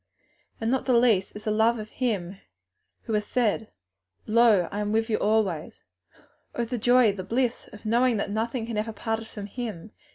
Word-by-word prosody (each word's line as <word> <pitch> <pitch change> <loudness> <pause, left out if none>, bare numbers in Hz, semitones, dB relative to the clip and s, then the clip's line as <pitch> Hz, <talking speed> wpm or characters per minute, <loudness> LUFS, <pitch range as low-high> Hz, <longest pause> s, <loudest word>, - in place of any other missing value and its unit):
and 225 +1 -1
not 265 0 0
the 255 - +4
least 220 -6 +2
the 215 - -1
love 220 +2 +3
of 215 0 -7
Him 200 -7 -2 0.7
who 225 - -4
has 210 0 +1
said, 220 -1 0 0.6
'Lo, 220 -5 +4
I 205 - -3
am 210 0 -1
with 225 +1 0
you 215 - +2
alway.' 205 -7 +1 0.8
Oh 240 - -1
the 240 +1 -3
joy, 245 -1 +5
the 195 -2 -6
bliss 240 +4 -1
of 210 +1 -13
knowing 235 +1 +3
that 200 - -2
nothing 225 +2 -2
can 230 -2 -4
ever 220 +1 -3
part 225 +1 -2
us 225 - -11
from 205 -2 -7
Him! 215 -3 -6
220 Hz, 190 wpm, -26 LUFS, 210-235 Hz, 0.8 s, joy